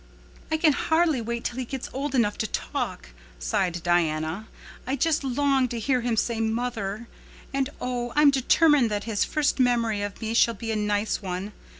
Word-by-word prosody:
"I 315 - +2
can 310 -2 +4
hardly 320 -2 +2
wait 235 +1 -3
till 245 - -3
he - - -1
gets 265 +1 -5
old 275 +1 -2
enough 210 -5 +2
to 220 - 0
talk," - - -4 0.3
sighed 170 - -1
Diana. 170 +3 0 0.4
"I 265 - 0
just 310 +2 +1
long 270 0 +2
to 240 - -5
hear 255 +2 +1
him 235 -1 -1
say 230 +1 0
'mother.' 225 -1 -2 0.5
And 270 0 0
oh, 245 -1 -3
I'm 295 -1 +6
determined 275 -1 +4
that 205 -1 -2
his 220 -3 0
first 300 -2 0
memory 235 -4 +2
of 205 0 -5
me 225 -1 -3
shall 230 0 +4
be 225 +2 -4
a - - -1
nice 210 0 0
one. 190 +2 -4
235 Hz, 185 wpm, -26 LUFS, 210-270 Hz, 0.5 s, I'm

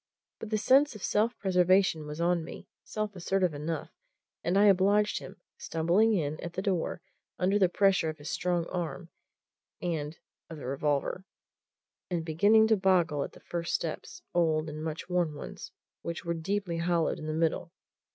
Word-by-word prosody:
But 225 - -7
the 215 - +1
sense 265 +5 +4
of 210 - -9
self 225 +3 +1
preservation 180 -4 +3
was 150 +1 -6
on 170 0 +2
me, - - -9 0.2
self 215 -1 -4
assertive 180 -1 0
enough, 150 +2 -4 0.5
and 175 +3 +1
I 205 - +6
obliged 205 +2 +4
him, - - -11 0.2
stumbling 180 +8 +2
in 155 -3 -1
at 170 - -6
the 190 - -3
door 180 -3 -1 0.3
under 195 +3 +2
the 185 -3 +4
pressure 195 -3 +3
of 155 - -6
his 145 0 -10
strong 175 -2 0
arm 175 0 -4 0.7
and 160 -2 -3 0.3
of 160 - -8
the 145 - -8
revolver, 145 +6 -1 0.8
and 170 -3 -2
beginning 205 +7 +5
to 220 - +5
boggle 175 -7 +2
at - - -7
the - - -15
first 170 -1 -2
steps 360 0 -5
old 160 -2 +2
and 155 +1 -6
much 160 0 -4
worn 175 -4 0
ones, - - -8 0.3
which 170 0 -5
were 170 - 0
deeply 170 +1 -2
hollowed 170 -1 +1
in 155 - -6
the - - -1
middle. 165 +1 0
175 Hz, 170 wpm, -29 LUFS, 160-195 Hz, 0.8 s, I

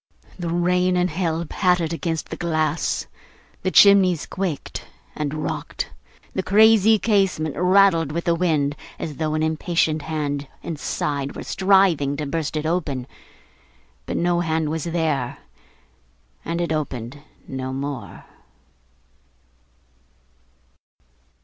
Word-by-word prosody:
The 175 -1 -3
rain 180 +1 +2
and 180 -1 +1
hail 165 -1 -1
pattered 180 -1 +1
against 165 -1 -3
the - - -4
glass; 155 -2 -1 0.6
the 185 - 0
chimneys 185 -4 +6
quaked 185 -6 -4 0.3
and 150 -2 -2
rocked; 155 0 -4 0.4
the 190 - 0
crazy 220 +2 +5
casement 195 -8 +1
rattled 180 -3 +4
with 170 +2 -2
the 170 - +3
wind, 155 -5 +1 0.2
as 150 -4 -5
though 155 -1 -1
an 155 - 0
impatient 160 0 0
hand 145 -2 -3 0.2
inside 145 -3 -3
were - - -6
striving 185 -8 +3
to 150 - -3
burst 155 +1 -2
it 155 - -2
open. 155 -7 -1 1.0
But - - -2
no 175 0 +2
hand 160 -2 0
was 160 -2 -3
there, 160 -7 -1 1.1
and 165 +1 -3
it 170 - -1
opened 140 -3 -4 0.3
no 130 0 -4
more. 135 -1 -6
160 Hz, 120 wpm, -22 LUFS, 150-180 Hz, 1.1 s, chimneys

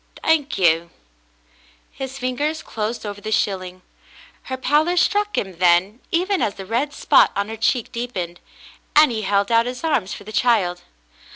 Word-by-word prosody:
"Thank 305 -3 +1
you," 170 -2 +3 1.0
his 265 0 -7
fingers 285 +5 -2
closed 220 +1 -4
over 205 0 -6
the 215 - -5
shilling. 185 -3 -1 0.6
Her 260 - -4
pallor 300 +7 +2
struck 415 +3 +1
him 190 -4 -3
then, 180 +5 +3
even 370 +2 +1
as 205 - 0
the 195 - -8
red 240 +8 -1
spot - - +4
on 200 +1 -1
her 225 - -5
cheek 225 +2 0
deepened, 190 -8 -5 0.6
and 300 -2 +7
he 220 -2 -2
held 200 +1 0
out 230 +1 +4
his 250 +5 -6
arms 240 - 0
for - - -7
the 215 - -10
child. 210 -6 +2
230 Hz, 165 wpm, -21 LUFS, 195-290 Hz, 1.0 s, and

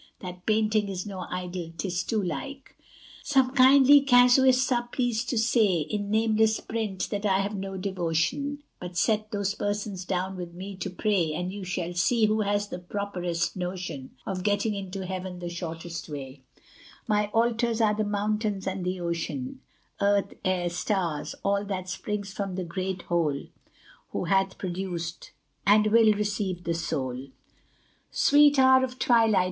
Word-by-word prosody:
That 180 -1 -9
painting 215 -1 +2
is 185 -2 -4
no 190 -3 -6
idol 180 -2 -5
'tis 180 -2 -1
too 220 -3 -1
like. 275 +9 -6 0.5
Some 265 -3 +2
kindly 275 +2 +7
casuists 255 0 +5
are 240 -1 +1
pleased 245 -1 -1
to 245 - 0
say, 220 -6 +3
In 205 +6 -3
nameless 220 0 +2
print, 220 -4 -3
that 205 0 -2
I 195 -2 +3
have 200 +2 -3
no 195 0 -5
devotion; 190 - -1 0.2
But 180 0 -7
set 215 +2 +1
those 200 -2 -1
persons 205 -2 -3
down 185 +1 -2
with 175 -1 -7
me 190 +2 -7
to 190 - -4
pray, 180 -4 0
And 180 +3 -3
you 200 -1 -6
shall 180 -1 -3
see 215 +6 +3
who 215 +1 +2
has 205 0 0
the 180 - -5
properest 180 -2 -3
notion 180 -7 -5
Of 190 -2 -3
getting 205 +2 +1
into 195 -1 -5
heaven 185 -1 -5
the 175 -1 -5
shortest 170 -1 -6
way: 135 -2 -7 0.7
My 210 0 +2
altars 230 +1 +1
are 215 -2 +3
the 215 +1 0
mountains 210 -1 -1
and 190 -1 -3
the 180 +1 -2
ocean, 255 +11 -4 0.4
Earth, 200 0 +2
air, 180 -2 0
stars 175 -4 -2
all 200 0 +2
that 185 -2 -4
springs 200 +1 -4
from 195 -3 -3
the 185 - -2
great 185 +1 -4
Whole, 160 -5 0 0.7
Who - - -1
hath 190 +1 +1
produced 175 -2 -5 0.4
and 210 +1 +6
will 225 -1 +6
receive 205 -3 -2
the 170 - -1
soul. 135 -6 -3 0.8
Sweet 290 0 +5
hour 260 0 +6
of 255 0 -3
twilight! 225 -6 +4
200 Hz, 160 wpm, -27 LUFS, 180-220 Hz, 0.8 s, kindly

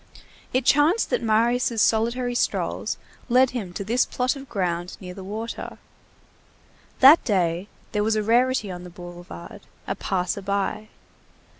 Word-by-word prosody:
It 255 0 0
chanced 310 +10 +3
that - - +1
Marius' 230 +1 +2
solitary 235 +3 +2
strolls 240 - -1 0.3
led 255 +1 +4
him 220 -8 -4
to 200 - -4
this 235 +5 +2
plot 250 +2 -1
of 275 -1 -10
ground, 175 -3 -2
near 180 -1 -8
the 190 0 -9
water. 220 +4 -6 1.2
That 280 +5 +9
day, 180 -3 0 0.2
there 210 -1 0
was 220 +1 +1
a 215 - 0
rarity 240 -1 +2
on 180 0 -7
the 180 - -9
boulevard, 175 - -10 0.2
a - - -1
passer 185 +1 -2
by. 200 +2 -2
215 Hz, 145 wpm, -24 LUFS, 185-245 Hz, 1.2 s, That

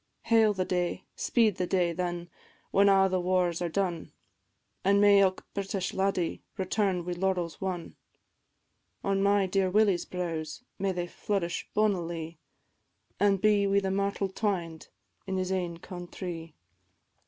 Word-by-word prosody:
Hail 225 -2 +4
the 185 -1 0
day, 180 -1 -1
speed 220 -5 +2
the 180 - -1
day, 175 -3 +1
then, 175 0 -3 0.4
when 200 +1 +5
a' 195 -1 +5
the 185 -1 0
wars 180 -1 +1
are 175 - -1
done! 175 -2 -2 0.7
An' 200 +1 +4
may 205 -1 +7
ilk 190 -1 +2
British 195 -1 -2
laddie 190 -3 0 0.2
return 190 -2 0
wi' 180 - -3
laurels 175 -2 -1
won; 180 -3 -4 1.1
On 195 0 +1
my 200 0 +3
dear 190 0 +1
Willie's 200 -2 +3
brows 165 +1 -4 0.2
may 195 0 +1
they 175 -1 -2
flourish 175 -1 -3
bonnily, 170 -6 -1 0.8
An' 200 0 +4
be 205 0 +3
wi' 200 0 +3
the 190 -1 -2
myrtle 200 0 0
twined 180 -6 -2 0.4
in 190 0 -1
his 185 0 -1
ain 175 -3 -2
countrie. 175 -2 -7
185 Hz, 140 wpm, -29 LUFS, 175-200 Hz, 1.1 s, may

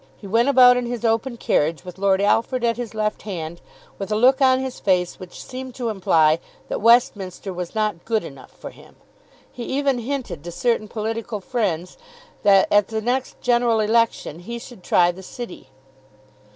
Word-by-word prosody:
He - - -13
went 230 +6 +2
about 250 -2 +7
in 245 -1 -2
his 240 -1 -4
open 230 +2 0
carriage, 160 -4 0
with 180 +1 -10
Lord 195 -1 +2
Alfred 230 +4 +1
at 230 -1 +2
his 235 -2 -6
left 215 -1 -1
hand, 170 -4 -6 0.4
with 195 +1 -5
a - - +2
look 255 +5 +4
on 260 -1 +5
his 265 -1 -5
face 180 -2 0
which 185 -1 -10
seemed 255 -1 -8
to 240 -3 -3
imply 165 -6 +3 0.3
that - - -3
Westminster 205 -5 +2
was 180 +3 -6
not 215 -5 -1
good 220 -4 0
enough 135 -5 -11
for - - -10
him. - - -18 0.6
He 245 - -10
even 275 0 0
hinted 240 - -4
to 175 - -7
certain 230 +3 0
political 220 0 -4
friends 185 -6 -3 0.4
that 195 -1 +5
at 205 -1 +4
the 220 -1 -3
next 250 +4 -2
general 240 -2 +2
election 220 -7 +1
he 235 +7 -6
should 235 -3 -11
try 175 0 +3
the 185 +2 -12
City. 235 +2 -9
220 Hz, 180 wpm, -22 LUFS, 185-240 Hz, 0.6 s, about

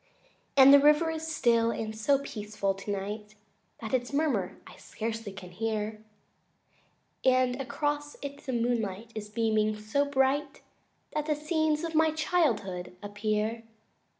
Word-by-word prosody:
II - - -34 0.3
And 275 +1 +9
the 285 - +10
river 300 +3 +4
is 320 0 -4
still, 235 -7 +2
and 220 -1 -3
so 275 +6 +3
peaceful 210 -6 -3
tonight 205 +2 -5 0.5
That 220 +1 -6
its 245 0 0
murmur 260 - 0
I - - -13
scarcely 225 -1 -5
can 185 -2 -10
hear, 215 +2 -3 1.2
And 255 0 +3
across 290 +2 -2
it 280 0 -6
the 265 - -2
moonlight 230 -3 -1
is 210 -1 -6
beaming 215 -1 +1
so 215 +7 0
bright 280 +1 0 0.5
That 300 0 -2
the 305 - +2
scenes 310 0 0
of 330 -1 -3
my 320 0 +4
childhood 240 - 0
appear. 215 +2 -1
235 Hz, 140 wpm, -29 LUFS, 215-290 Hz, 1.2 s, the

